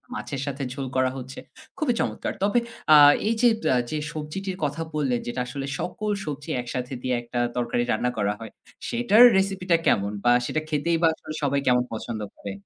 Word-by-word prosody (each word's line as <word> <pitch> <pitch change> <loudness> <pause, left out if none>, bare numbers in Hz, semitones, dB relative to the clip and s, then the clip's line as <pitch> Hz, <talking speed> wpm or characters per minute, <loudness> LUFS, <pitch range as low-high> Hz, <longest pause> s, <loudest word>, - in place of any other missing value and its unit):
মাছের 140 - -5
সাথে 140 0 -3
ঝোল 135 -1 -4
করা 130 0 +2
হচ্ছে।" 130 +2 -8 0.4
খুবই 295 -7 +1
চমৎকার! - - -2
তবে 205 +4 +3 0.3
আ - - +10 0.3
এই 225 - +3
যে 245 - +6 0.2
ব্যা - - +3
যে 155 - -2 0.2
সবজিটির 180 +5 -5
কথা 145 +3 -1
বললেন। 135 -5 0
যেটা 125 +1 -2
আসলে 135 +2 -5
সকল 210 +3 -3
সবজি 150 +1 -6
একসাথে 125 +1 -5
দিয়ে 130 -1 0
একটা 120 +1 -4 0.2
তরকারি 120 0 0
রান্না 125 +3 +1
করা 105 0 +1
হয়। 115 -1 -9 0.4
সেটার 240 -1 +5
রেসিপিটা 190 -3 +1
কেমন? 100 0 +2
বা 120 - +4
সেটা 155 - -1
খেতেই 160 +3 +1
বা 165 - +5
আসলে 155 - -9
সবাই 140 0 +1
কেমন 125 0 +4
পছন্দ 110 0 -5 0.2
করে? 100 - -6
140 Hz, 185 wpm, -25 LUFS, 125-170 Hz, 0.4 s, আ